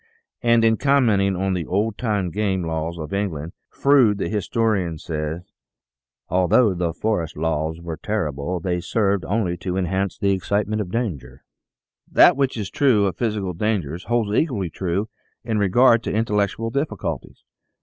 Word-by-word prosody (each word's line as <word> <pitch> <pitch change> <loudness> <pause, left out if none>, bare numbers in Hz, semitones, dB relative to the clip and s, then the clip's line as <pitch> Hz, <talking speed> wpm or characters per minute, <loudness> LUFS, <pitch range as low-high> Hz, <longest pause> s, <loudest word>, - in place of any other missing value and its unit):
And 115 -2 +4
in 110 -1 +3
commenting 110 -9 +3
on 95 +1 -1
the 85 -4 -3
old 105 +3 0
time 105 -7 -1
game 95 -1 -1
laws 80 +1 -3
of 80 0 -6
England, 85 -6 -2 0.2
Froude, 130 -7 +4
the - - -2
historian, 105 -5 0
says: 80 +2 -5 0.4
" - - -70
Although 95 +4 +3
the 90 -1 -1
old 80 - -6
forest 105 -9 -1
laws 80 0 -1
were 85 -2 -6
terrible, 90 -4 -2
they 90 +1 -1
served 100 -1 0
only 90 -1 -1
to 90 0 -3
enhance 95 0 -1
the 100 -2 +1
excite 100 +2 0
ment 110 0 -1
by 115 - 0
danger." 65 - -6 0.7
That - - +7
which 135 -3 0
is 100 -3 -4
true 125 -8 +3
of 95 - -1
physical 105 -6 -2
dangers 90 -4 -2
holds 115 -3 0
equally 105 - 0
true 95 +5 -2 0.4
in 110 -2 -1
regard 115 +4 +4
to - - -1
intellectual 110 +1 0
difficulties. 110 - -4
100 Hz, 160 wpm, -22 LUFS, 85-110 Hz, 0.7 s, That